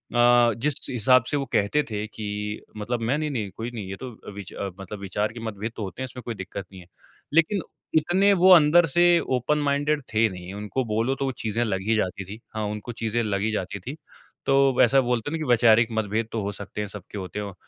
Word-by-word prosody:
अ, 120 Hz, -1 st, +5 dB
जिस 145 Hz, +3 st, 0 dB
हिसाब 125 Hz, +1 st, +4 dB
से 145 Hz, -, +1 dB
वो 140 Hz, -, -2 dB
कहते 105 Hz, +9 st, +2 dB
थे 105 Hz, -1 st, -3 dB
कि 110 Hz, 0 st, -8 dB, 0.5 s
मतलब 115 Hz, +3 st, -3 dB
मैं 120 Hz, +6 st, +1 dB
नहीं-नहीं 135 Hz, -10 st, -2 dB
कोई 115 Hz, +2 st, -4 dB
नहीं 105 Hz, -5 st, -5 dB
ये 95 Hz, -, -4 dB
तो 130 Hz, -, -7 dB, 0.2 s
विच 100 Hz, -1 st, -8 dB, 0.3 s
मतलब 95 Hz, +2 st, -7 dB
विचार 105 Hz, +2 st, -2 dB
के 120 Hz, -, -8 dB
मतभेद 110 Hz, 0 st, -4 dB
तो 110 Hz, -, -4 dB
होते 95 Hz, +6 st, -6 dB
हैं -, -, -1 dB
इसमें 125 Hz, 0 st, -8 dB
कोई 115 Hz, -2 st, -4 dB
दिक़्क़त 95 Hz, 0 st, -6 dB
नहीं 95 Hz, -, -11 dB
है। 90 Hz, -, -16 dB, 0.5 s
लेकिन 165 Hz, +5 st, +3 dB, 0.4 s
इतने 190 Hz, +6 st, +3 dB
वो 185 Hz, 0 st, +5 dB
अंदर 165 Hz, +2 st, +6 dB
से 175 Hz, +5 st, +3 dB, 0.3 s
ओपन 130 Hz, +5 st, 0 dB
माइंडेड 145 Hz, +1 st, +1 dB
थे 110 Hz, +1 st, +4 dB
नहीं। 90 Hz, 0 st, -8 dB
उनको 105 Hz, +6 st, -3 dB
बोलो 115 Hz, +5 st, 0 dB
तो 135 Hz, -, -2 dB
वो 135 Hz, -, 0 dB
चीज़ें 115 Hz, +2 st, 0 dB
लग 95 Hz, -4 st, -1 dB
ही 115 Hz, -, +3 dB
जाती 100 Hz, -2 st, -1 dB
थीं 100 Hz, +4 st, -8 dB, 0.2 s
हाँ, 110 Hz, -, -1 dB
उनको 105 Hz, +3 st, -5 dB
चीज़ें 115 Hz, 0 st, -1 dB
लग 100 Hz, -2 st, -1 dB
ही 110 Hz, -, 0 dB
जाती 100 Hz, -1 st, -3 dB
थीं। 130 Hz, +10 st, -7 dB, 0.5 s
तो 135 Hz, 0 st, +4 dB
वैसा 135 Hz, +3 st, +5 dB
बोलते 125 Hz, +2 st, -1 dB
हैं 165 Hz, -, -1 dB
ना -, -, -8 dB
कि 125 Hz, -, -5 dB
वैचारिक 115 Hz, -1 st, +5 dB
मतभेद 110 Hz, +1 st, -1 dB
तो 115 Hz, -, -2 dB
हो 100 Hz, -, -2 dB
सकते 100 Hz, +1 st, -6 dB
हैं 105 Hz, -, -3 dB
सब 100 Hz, -1 st, -8 dB
होते 95 Hz, +1 st, -5 dB
हैं। 100 Hz, -2 st, -5 dB
115 Hz, 230 wpm, -25 LUFS, 105-135 Hz, 0.5 s, अंदर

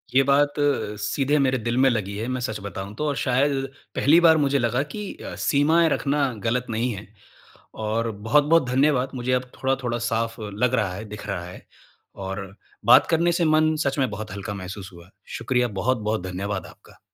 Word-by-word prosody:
ये 135 Hz, -, +7 dB
बात 145 Hz, +1 st, +3 dB, 0.5 s
सीधे 140 Hz, +6 st, 0 dB
मेरे 130 Hz, -1 st, +2 dB
दिल 120 Hz, +1 st, -2 dB
में 135 Hz, +1 st, +5 dB
लगी 105 Hz, -5 st, -2 dB
है। 110 Hz, +3 st, -3 dB
मैं 130 Hz, 0 st, -2 dB
सच 110 Hz, -3 st, -3 dB
बताऊँ 100 Hz, 0 st, -6 dB
तो, 150 Hz, +3 st, -1 dB
शायद 135 Hz, +1 st, +1 dB, 0.3 s
पहली 155 Hz, +5 st, +5 dB
बार 160 Hz, -2 st, +6 dB
मुझे 140 Hz, -2 st, +2 dB
लगा 120 Hz, +2 st, +1 dB
की 210 Hz, -2 st, -5 dB
अ, -, -, -8 dB
सीमाएँ 160 Hz, +4 st, +3 dB
रखना 145 Hz, -1 st, 0 dB, 0.2 s
गलत 125 Hz, +2 st, 0 dB
नहीं 115 Hz, +2 st, -1 dB
है। 100 Hz, 0 st, -9 dB, 0.8 s
और 115 Hz, +2 st, 0 dB
बहुत-बहुत 145 Hz, +9 st, +3 dB
धन्यवाद। 135 Hz, 0 st, +2 dB
मुझे 125 Hz, 0 st, -2 dB
अब 125 Hz, 0 st, -1 dB
थोड़ा-थोड़ा 130 Hz, -3 st, -1 dB
साफ 115 Hz, 0 st, -1 dB
लग 110 Hz, +4 st, -1 dB
रहा 105 Hz, -7 st, +1 dB
है, 105 Hz, +4 st, -7 dB
दिख 105 Hz, -1 st, -9 dB
रहा 90 Hz, -4 st, -3 dB
है। 90 Hz, -, -11 dB, 0.5 s
और 95 Hz, 0 st, -6 dB, 0.3 s
बात 125 Hz, +2 st, +7 dB
करने 170 Hz, +1 st, +2 dB
से 170 Hz, 0 st, +1 dB
मन 155 Hz, 0 st, +3 dB
सच 140 Hz, +1 st, 0 dB
में 130 Hz, -3 st, +2 dB
बहुत 105 Hz, 0 st, -6 dB
हल्का 100 Hz, +1 st, -5 dB
महसूस 95 Hz, 0 st, -7 dB
हुआ। 85 Hz, 0 st, -14 dB, 0.3 s
शुक्रिया, 125 Hz, -1 st, +1 dB
बहुत-बहुत 110 Hz, -2 st, 0 dB
धन्यवाद 95 Hz, +1 st, -4 dB
आपका। -, -, -17 dB
125 Hz, 180 wpm, -24 LUFS, 105-140 Hz, 0.8 s, ये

